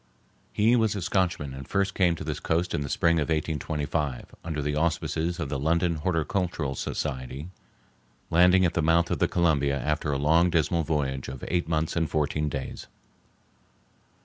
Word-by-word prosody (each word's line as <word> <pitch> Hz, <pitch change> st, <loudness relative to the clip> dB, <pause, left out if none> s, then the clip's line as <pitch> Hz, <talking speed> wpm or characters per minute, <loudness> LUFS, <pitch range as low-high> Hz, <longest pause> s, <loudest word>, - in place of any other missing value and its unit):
He 110 Hz, +4 st, +3 dB
was 110 Hz, -3 st, +2 dB
a 100 Hz, -, -3 dB
Scotchman 90 Hz, -7 st, 0 dB
and 65 Hz, 0 st, -8 dB
first 100 Hz, -1 st, 0 dB
came 90 Hz, -3 st, +2 dB
to -, -, -7 dB
this -, -, -3 dB
coast 85 Hz, +2 st, 0 dB
in -, -, 0 dB
the 70 Hz, -, -4 dB
spring 85 Hz, +3 st, +2 dB
of 75 Hz, -, +1 dB
1825 75 Hz, -3 st, -2 dB
under 80 Hz, -2 st, -3 dB
the 75 Hz, 0 st, -1 dB
auspices 85 Hz, +1 st, -1 dB
of 80 Hz, -5 st, -3 dB
the 70 Hz, -, -2 dB
London 85 Hz, +3 st, +1 dB
Horticultural 85 Hz, -3 st, -1 dB
Society, 65 Hz, +4 st, -4 dB, 0.8 s
landing 90 Hz, +2 st, +5 dB
at 85 Hz, -, +1 dB
the 85 Hz, -, +1 dB
mouth 85 Hz, +2 st, +3 dB
of -, -, 0 dB
the -, -, +3 dB
Columbia 70 Hz, -5 st, +1 dB
after 75 Hz, +2 st, -1 dB
a 70 Hz, -, 0 dB
long 80 Hz, +5 st, +4 dB
dismal 85 Hz, 0 st, +1 dB
voyage 70 Hz, -4 st, -1 dB
of 65 Hz, -2 st, -7 dB
eight 85 Hz, -2 st, 0 dB
months 80 Hz, -1 st, 0 dB
and 80 Hz, -1 st, 0 dB
fourteen 75 Hz, 0 st, 0 dB
days. 70 Hz, -2 st, -6 dB
80 Hz, 175 wpm, -27 LUFS, 75-85 Hz, 0.8 s, landing